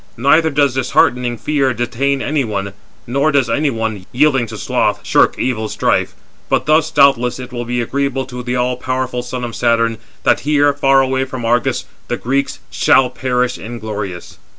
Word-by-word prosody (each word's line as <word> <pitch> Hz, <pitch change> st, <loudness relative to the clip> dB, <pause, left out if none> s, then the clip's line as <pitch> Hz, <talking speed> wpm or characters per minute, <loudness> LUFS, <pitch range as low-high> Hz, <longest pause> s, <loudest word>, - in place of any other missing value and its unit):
Neither 155 Hz, +6 st, +4 dB
does 140 Hz, -3 st, +2 dB
disheartening 125 Hz, -1 st, +1 dB
fear 135 Hz, -1 st, 0 dB
detain 135 Hz, +4 st, -1 dB
any 150 Hz, -1 st, 0 dB
one, 100 Hz, -3 st, -4 dB, 0.3 s
nor 140 Hz, +5 st, +1 dB
does 140 Hz, -4 st, +1 dB
any 150 Hz, 0 st, +1 dB
one, 110 Hz, -5 st, -4 dB
yielding 135 Hz, -2 st, +2 dB
to 110 Hz, 0 st, -8 dB
sloth, -, -, 0 dB
shirk -, -, +3 dB
evil 110 Hz, -4 st, -2 dB
strife; -, -, 0 dB, 0.3 s
but -, -, +1 dB
thus, 155 Hz, +1 st, +3 dB
doubtless, 135 Hz, -5 st, +3 dB
it 125 Hz, 0 st, -9 dB
will 120 Hz, -1 st, -4 dB
be 120 Hz, +1 st, -1 dB
agreeable 135 Hz, +2 st, -2 dB
to 125 Hz, -1 st, -7 dB
the 125 Hz, 0 st, -3 dB
all 125 Hz, 0 st, 0 dB
powerful 130 Hz, -1 st, -2 dB
son 125 Hz, 0 st, -5 dB
of 120 Hz, -1 st, -5 dB
Saturn, 115 Hz, -2 st, +1 dB, 0.2 s
that -, -, +3 dB
here, 145 Hz, -1 st, +2 dB
far 135 Hz, -1 st, +3 dB
away 130 Hz, 0 st, 0 dB
from 130 Hz, -3 st, -6 dB
Argos, 120 Hz, 0 st, 0 dB, 0.2 s
the -, -, -2 dB
Greeks 140 Hz, +2 st, -1 dB
shall 130 Hz, -2 st, +3 dB
perish 125 Hz, -1 st, -1 dB
inglorious. 105 Hz, -6 st, -6 dB
125 Hz, 175 wpm, -17 LUFS, 120-140 Hz, 0.3 s, Neither